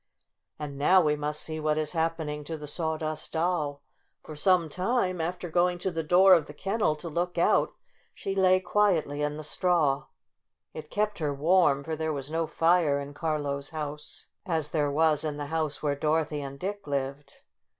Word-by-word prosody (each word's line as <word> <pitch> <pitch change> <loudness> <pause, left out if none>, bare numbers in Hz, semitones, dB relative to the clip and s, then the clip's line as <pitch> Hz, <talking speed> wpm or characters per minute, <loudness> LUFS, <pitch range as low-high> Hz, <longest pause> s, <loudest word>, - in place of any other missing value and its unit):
And 145 -2 -6
now 185 +6 +5
we 150 -4 +2
must 150 +1 -3
see 155 -1 -4
what 155 0 0
is 155 -1 -1
happen 165 -1 -1
ing 150 0 -4
to 160 +1 -5
the 150 - -8
Sawdust 155 0 -3
Doll. 160 -4 -1 0.4
For 155 - -9
some 175 +2 +3
time, 185 - 0
after 175 +2 -3
going 175 +1 +2
to 185 +2 -2
the 165 -1 -2
door 180 +4 +6
of 165 -4 +3
the 145 - -11
kennel 195 -3 0
to 155 +3 -8
look 175 +2 -2
out, 170 - +3 0.4
she 195 - -3
lay 185 -1 +4
quietly 175 -7 +1
in 150 0 -1
the 155 - -6
straw. 150 -4 +1 0.7
It 155 -1 -8
kept 210 -1 -1
her 145 -3 -1
warm, 150 -2 +3
for 160 +2 -3
there 160 0 -2
was 140 0 -4
no 165 0 0
fire 165 -4 +2
in 140 0 -7
Carlo's 145 -3 -2
house, 150 -1 -6 0.2
as 160 -4 -1
there 150 -3 +1
was 155 0 +2
in 150 -2 -3
the 145 - -4
house 155 -3 -2
where 145 -1 +1
Dorothy 150 +1 0
and 140 0 -7
Dick 200 -1 -5
lived. 140 0 -4
155 Hz, 190 wpm, -28 LUFS, 150-175 Hz, 0.7 s, door